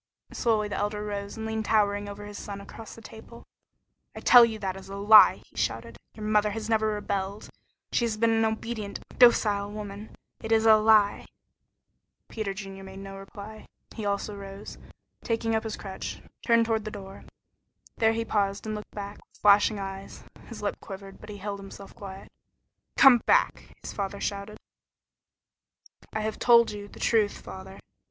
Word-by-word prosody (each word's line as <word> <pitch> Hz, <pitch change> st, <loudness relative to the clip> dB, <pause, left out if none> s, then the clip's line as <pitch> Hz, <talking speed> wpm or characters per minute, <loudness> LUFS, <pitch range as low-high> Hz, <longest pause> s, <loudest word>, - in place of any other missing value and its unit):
Slowly 220 Hz, -3 st, +1 dB
the 205 Hz, -, -4 dB
Elder 210 Hz, 0 st, -2 dB
rose 200 Hz, 0 st, -5 dB
and 220 Hz, -, -5 dB
leaned 220 Hz, 0 st, -2 dB
towering 205 Hz, -2 st, +1 dB
over 205 Hz, +1 st, -8 dB
his 205 Hz, 0 st, -8 dB
son 200 Hz, -1 st, -7 dB
across 210 Hz, +2 st, -11 dB
the 230 Hz, -, -14 dB
table. 225 Hz, +2 st, -12 dB, 0.7 s
"I -, -, -6 dB
tell 245 Hz, -1 st, +8 dB
you 225 Hz, -2 st, +1 dB
that 190 Hz, -3 st, -3 dB
is 195 Hz, 0 st, -11 dB
a 195 Hz, -, -6 dB
lie!" 210 Hz, +2 st, +7 dB
he -, -, -29 dB
shouted. -, -, -3 dB, 0.2 s
"Your 215 Hz, -, -7 dB
mother 210 Hz, 0 st, +3 dB
has 215 Hz, +1 st, -5 dB
never 220 Hz, -1 st, +2 dB
rebelled. 200 Hz, -1 st, -3 dB, 0.4 s
She 240 Hz, -, +1 dB
has 220 Hz, -2 st, -2 dB
been 230 Hz, +1 st, +3 dB
an 225 Hz, 0 st, +2 dB
obedient, 220 Hz, -1 st, -3 dB, 0.2 s
docile 210 Hz, -4 st, +5 dB
woman. 205 Hz, 0 st, -8 dB, 0.3 s
It 225 Hz, -, -5 dB
is 225 Hz, 0 st, +4 dB
a 220 Hz, -1 st, +8 dB
lie!" 215 Hz, -1 st, +4 dB, 1.0 s
Peter 215 Hz, -3 st, -3 dB
Junior 195 Hz, 0 st, -8 dB
made 190 Hz, 0 st, -10 dB
no 195 Hz, 0 st, -8 dB
reply. 205 Hz, +2 st, -10 dB, 0.3 s
He 220 Hz, -, -6 dB
also 205 Hz, +1 st, -2 dB
rose, 195 Hz, 0 st, -9 dB
and -, -, -18 dB, 0.3 s
taking 225 Hz, -1 st, -1 dB
up 220 Hz, +1 st, 0 dB
his 220 Hz, -, -4 dB
crutch, 190 Hz, -2 st, -6 dB, 0.2 s
turned 230 Hz, -1 st, +4 dB
toward 225 Hz, -1 st, 0 dB
the 215 Hz, -, -5 dB
door. 195 Hz, -2 st, -10 dB, 0.7 s
There 225 Hz, 0 st, +3 dB
he 230 Hz, 0 st, -2 dB
paused 200 Hz, -2 st, -1 dB
and 215 Hz, -, -3 dB
looked 210 Hz, 0 st, -8 dB
back, 205 Hz, 0 st, -6 dB
with -, -, -23 dB
flashing 205 Hz, +1 st, +5 dB
eyes. 195 Hz, 0 st, -7 dB, 0.2 s
His -, -, -9 dB
lip -, -, -2 dB
quivered, 195 Hz, -1 st, -10 dB
but 215 Hz, -, -12 dB
he 205 Hz, -, -7 dB
held 200 Hz, 0 st, -5 dB
himself 195 Hz, 0 st, -11 dB
quiet. 195 Hz, -1 st, -10 dB, 0.7 s
"Come 260 Hz, -3 st, +8 dB
back!" -, -, +2 dB
shouted 200 Hz, -1 st, -4 dB
his -, -, -3 dB
father. 200 Hz, +1 st, -8 dB, 1.6 s
"I 215 Hz, -, -2 dB
have 215 Hz, 0 st, -3 dB
told 235 Hz, -2 st, +6 dB
you 205 Hz, -1 st, -7 dB
the -, -, -14 dB
truth, 215 Hz, -3 st, +2 dB
father." 190 Hz, +1 st, -10 dB
210 Hz, 180 wpm, -27 LUFS, 200-220 Hz, 1.6 s, tell